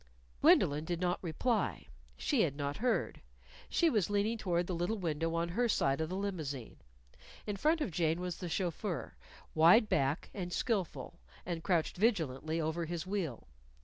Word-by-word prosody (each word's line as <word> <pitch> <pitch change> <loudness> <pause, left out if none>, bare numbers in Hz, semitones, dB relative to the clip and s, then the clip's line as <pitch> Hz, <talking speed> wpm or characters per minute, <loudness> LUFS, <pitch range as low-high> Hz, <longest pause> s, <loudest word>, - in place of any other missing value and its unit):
Gwendolyn 145 +1 +5
did 170 +1 -3
not 180 0 0
reply. 215 +8 -1 0.3
She 275 -7 +1
had 145 -7 +1
not 145 0 -3
heard. 245 +2 0 0.5
She 340 - +3
was 215 - +2
leaning 205 +2 +1
toward 175 -5 0
the 180 - -3
little 175 +6 -1
window 165 -2 -1
on 170 +1 0
her 235 +7 +1
side 135 -7 +2
of 160 - -2
the 185 - -3
limousine. 155 - -4 0.7
In 210 - -2
front 310 +10 +2
of 240 - -1
Jane 165 0 +1
was 180 -1 -3
the 180 - -5
chauffeur, 175 +1 -2 0.4
wide 175 +8 +6
backed 140 +2 0
and 180 -3 -4
skillful, 200 -4 -2 0.3
and 170 -2 -3
crouched 175 -4 +1
vigilantly 160 - +1
over 165 +1 -1
his 170 +1 -4
wheel. 185 - -3
175 Hz, 165 wpm, -33 LUFS, 160-205 Hz, 0.7 s, wide